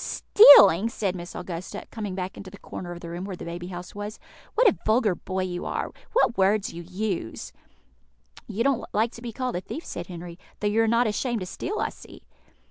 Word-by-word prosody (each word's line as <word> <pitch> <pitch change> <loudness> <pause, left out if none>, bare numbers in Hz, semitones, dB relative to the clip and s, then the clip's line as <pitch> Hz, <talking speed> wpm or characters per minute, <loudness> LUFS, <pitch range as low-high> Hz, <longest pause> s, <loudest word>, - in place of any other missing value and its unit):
"Stealing!" 215 - +7
said 200 -5 -2
Miss 175 -1 -8
Augusta, 180 +3 -6
coming 210 -5 -5
back 185 0 -4
into 195 - -9
the 200 - -12
corner 180 -2 -8
of 175 0 -8
the 170 - -7
room 175 +2 -5
where 195 -1 -5
the - - -9
baby 175 +1 -6
house 180 -1 -8
was; 205 +1 -6 0.4
"what 480 +2 +5
a 390 - +4
vulgar 215 -2 +3
boy 185 +1 -3
you 180 -1 -4
are! - - -3 0.2
What 450 - +2
words 200 +2 +2
you 170 - -7
use!" 185 - -4 0.9
"You 225 +4 -1
don't 275 -2 +1
like 220 +2 +2
to 235 - -12
be 235 -1 -5
called 250 -2 -3
a - - -4
thief," 315 - -7
said 175 0 -6
Henry, 175 -1 -9 0.2
"though - - -4
you 210 +2 +3
are 225 - +2
not 235 +2 +3
ashamed 230 +1 -1
to - - -3
steal, 400 - -4
I - - 0
see." - - -14
200 Hz, 215 wpm, -25 LUFS, 180-230 Hz, 0.9 s, Stealing